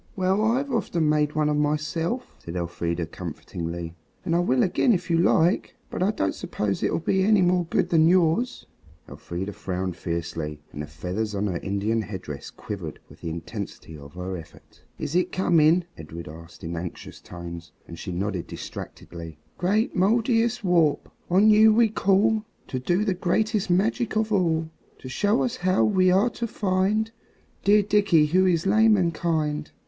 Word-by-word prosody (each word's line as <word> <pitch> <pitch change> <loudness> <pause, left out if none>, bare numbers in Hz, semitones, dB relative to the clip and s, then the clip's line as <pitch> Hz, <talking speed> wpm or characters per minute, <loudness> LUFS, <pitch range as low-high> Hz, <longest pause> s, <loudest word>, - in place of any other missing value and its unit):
"Well, 190 +2 +1
I've 260 +5 +1
often 175 -9 0
made 150 0 +1
one 155 -1 +2
of 150 0 +1
myself," 155 - -1
said 85 - -8
Elfrida 85 -1 -2
comfortingly, 85 0 -6 0.3
"and 165 - +1
I - - +3
will 130 -8 +2
again 230 +6 +3
if 175 -2 -2
you 165 - +3
like. 170 +1 +2 0.2
But - - -4
I 190 - +3
don't 95 - 0
suppose 100 -2 -3
it'll - - +1
be 190 +3 +1
any 205 -1 +4
more 180 0 +2
good 165 - 0
than 160 -1 +5
yours." 185 +7 +2 0.4
Elfrida 95 +4 -6
frowned 95 -2 -3
fiercely 85 -3 -4
and 75 - -6
the 75 - -6
feathers 95 +8 -4
on 100 +1 -1
her 90 -4 -2
Indian 100 +3 -1
head 100 -3 -7
dress 75 -2 -7
quivered 90 -7 -7
with - - -17
the 85 - -4
intensity 80 0 -7
of 70 +1 -12
her 90 +1 -4
effort. 80 - -15 0.2
"Is 145 - -4
it 180 - +2
coming?" 170 -1 +4
Edred 80 +2 -9
asked 80 +2 -12
in 85 +1 -4
anxious 85 +1 -7
tones, 85 -1 -9 0.2
and 85 0 -9
she - - -5
nodded 95 0 -3
distractedly. 85 -2 -8 0.2
"Great 205 +6 +1
Mouldiestwarp, 220 - +2 0.2
on 200 +5 +5
you 215 +1 +7
we 225 +1 +4
call 210 +1 +2 0.3
To 130 - -2
do 175 +10 +1
the 195 - +1
greatest 205 +3 0
magic 205 +5 +1
of 220 0 0
all; 165 -4 +1 0.3
To - - -10
show 205 - +1
us 250 0 -2
how 185 -1 +2
we 185 -3 +3
are 200 +6 +3
to 235 - -4
find 205 +2 0 0.5
Dear 205 +1 +5
Dickie 200 -6 +4
who 185 +5 +3
is 170 -2 +1
lame 215 +2 +5
and 170 -3 +1
kind. 155 -2 -1
165 Hz, 175 wpm, -25 LUFS, -, 0.5 s, you